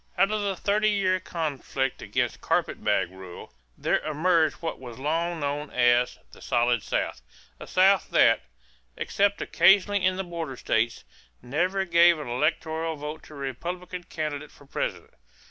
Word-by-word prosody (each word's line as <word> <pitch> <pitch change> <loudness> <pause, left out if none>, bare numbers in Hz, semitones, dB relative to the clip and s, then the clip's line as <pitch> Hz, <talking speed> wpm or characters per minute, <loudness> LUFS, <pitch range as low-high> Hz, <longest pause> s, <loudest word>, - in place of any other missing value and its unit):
= - - -33
Out 195 +3 +3
of 215 -1 0
the 200 -1 -1
thirty 210 +3 +1
year 190 -3 +1
conflict 145 -6 -3
against - - -2
"carpet - - -1
bag 85 - +1
rule" 95 -6 -11 0.2
there - - +1
emerged 155 +1 +2
what 165 - -5
was 120 -3 -9
long 165 +5 -1
known 145 0 -2
as 120 0 +3
the - - -15
"solid 120 -1 +1
South" 65 - -2 0.4
a - - -9
South 190 +1 +4
that, - - +4 0.6
except 200 0 +1
occasionally 200 +1 +4
in 185 0 +3
the 190 - -2
border 165 -7 -5
states, 115 0 0 0.4
never 180 +9 0
gave 170 -1 +5
an 150 - -6
electoral 160 +5 -1
vote 150 +1 -6
to 155 - -14
a - - -10
Republican 175 +7 -5
candidate 150 -3 -4
for 145 - -19
President. - - -4
160 Hz, 160 wpm, -26 LUFS, 135-185 Hz, 0.6 s, gave